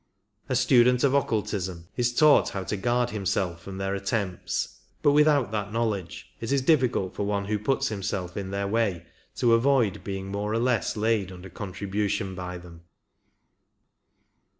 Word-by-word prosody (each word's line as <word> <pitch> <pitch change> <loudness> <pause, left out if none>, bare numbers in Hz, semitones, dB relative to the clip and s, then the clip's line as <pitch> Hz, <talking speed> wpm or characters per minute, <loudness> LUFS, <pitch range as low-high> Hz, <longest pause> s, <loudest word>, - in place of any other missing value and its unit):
A 130 - +1
student 125 0 +4
of 140 -1 +3
occultism 95 -9 -1
is 120 -1 +1
taught 150 +4 +5
how 95 - -4
to 100 - -3
guard 120 +4 0
himself 95 -4 -1
from 95 +2 -8
their 95 0 -2
attempts, 100 -1 -2 0.2
but 145 - +5
without 145 -6 +4
that 105 -2 -3
knowledge 105 -6 -3
it 115 - -4
is 140 -2 +2
difficult 125 - +2
for - - -3
one 100 0 -1
who 105 +1 -1
puts 135 +5 0
himself 95 -3 -3
in 100 -2 -4
their 100 +1 -2
way 100 -5 0 0.3
to 120 -2 +3
avoid 115 -4 +2
being 95 -1 -4
more 105 +2 -2
or - - +1
less 120 -2 0
laid 105 -3 +1
under 90 0 -10
contribution 100 +1 -3
by 90 0 -5
them. 85 -1 -13
105 Hz, 160 wpm, -26 LUFS, 95-120 Hz, 0.3 s, taught